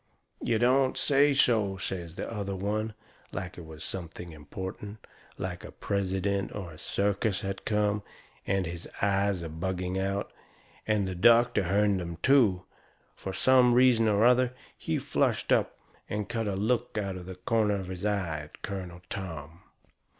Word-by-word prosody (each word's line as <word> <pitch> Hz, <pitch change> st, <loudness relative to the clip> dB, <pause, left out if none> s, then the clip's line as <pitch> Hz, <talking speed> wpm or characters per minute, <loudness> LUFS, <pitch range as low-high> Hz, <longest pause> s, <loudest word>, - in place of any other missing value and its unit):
"You 115 Hz, -, +2 dB
don't 130 Hz, +3 st, +3 dB
say 145 Hz, 0 st, +4 dB
so!" 110 Hz, -7 st, +3 dB
says 90 Hz, -3 st, -5 dB
the -, -, -4 dB
other 100 Hz, -3 st, -3 dB
one, 105 Hz, +3 st, -2 dB, 0.4 s
like 90 Hz, 0 st, -5 dB
it 85 Hz, -, -9 dB
was 80 Hz, -1 st, -9 dB
something 85 Hz, -1 st, -6 dB
important, 95 Hz, +7 st, -7 dB, 0.3 s
like -, -, -4 dB
a -, -, -8 dB
president 100 Hz, 0 st, -1 dB
or 95 Hz, -5 st, -5 dB
a 75 Hz, -, -12 dB
circus 100 Hz, 0 st, 0 dB
had 95 Hz, 0 st, -4 dB
come, 105 Hz, -1 st, +1 dB, 0.5 s
and 95 Hz, -1 st, +1 dB
his 85 Hz, 0 st, -6 dB
eyes 100 Hz, -2 st, +2 dB
a -, -, -4 dB
bugging 90 Hz, +3 st, -2 dB
out. 100 Hz, +1 st, -2 dB, 0.5 s
And 105 Hz, -3 st, +2 dB
the 95 Hz, -, -3 dB
doctor 115 Hz, +2 st, +5 dB
hearn 100 Hz, +2 st, +3 dB
them, 85 Hz, -2 st, -5 dB
too. 110 Hz, -10 st, +4 dB, 0.5 s
Fur 95 Hz, -, -5 dB
some 125 Hz, +3 st, +5 dB
reason 125 Hz, -3 st, +5 dB
or 105 Hz, +1 st, +4 dB
other 125 Hz, 0 st, +4 dB, 0.2 s
he -, -, -2 dB
flushed -, -, 0 dB
up -, -, +2 dB, 0.3 s
and 105 Hz, -1 st, -2 dB
cut 115 Hz, -1 st, -2 dB
a 100 Hz, -, -1 dB
look 110 Hz, +3 st, 0 dB
out 100 Hz, -2 st, -1 dB
of 90 Hz, -1 st, -8 dB
the 95 Hz, -, -6 dB
corner 105 Hz, +2 st, +1 dB
of 95 Hz, -2 st, -3 dB
his 90 Hz, 0 st, -7 dB
eye 95 Hz, -7 st, 0 dB
at 75 Hz, 0 st, -12 dB
Colonel 90 Hz, -3 st, -6 dB
Tom. 85 Hz, -4 st, -6 dB
100 Hz, 165 wpm, -29 LUFS, 90-110 Hz, 0.5 s, doctor